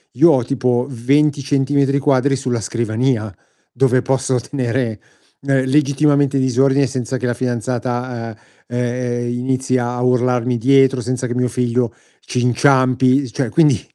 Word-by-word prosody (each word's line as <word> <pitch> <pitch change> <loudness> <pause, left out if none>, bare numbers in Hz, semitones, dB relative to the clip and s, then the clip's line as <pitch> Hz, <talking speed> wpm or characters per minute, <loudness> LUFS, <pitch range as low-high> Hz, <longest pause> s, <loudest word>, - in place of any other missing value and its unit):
io 165 +6 +5
ho 130 -4 +2
tipo 125 -1 -1
20 140 +4 +1
centimetri 140 0 +1
quadri 135 0 +2
sulla 125 -3 -2
scrivania, 115 +1 -1 0.4
dove 130 -1 +2
posso 130 -1 0
tenere 120 -3 -3 0.4
legittimamente 140 +1 +2
disordine 135 +2 +2
senza 130 0 -4
che 125 - -4
la 120 - 0
fidanzata, 120 -1 -3 0.3
ehm, 120 0 -2
inizi 130 +1 -1
a 120 0 -3
urlarmi 125 -1 +1
dietro 135 +1 +3
senza 125 +1 -3
che 120 - -4
mio 125 0 +1
figlio 120 0 -1 0.3
ci 125 - -3
inciampi, 130 +1 +2
cioè 130 -1 -2
quindi 150 - +3
125 Hz, 130 wpm, -18 LUFS, 120-135 Hz, 0.4 s, io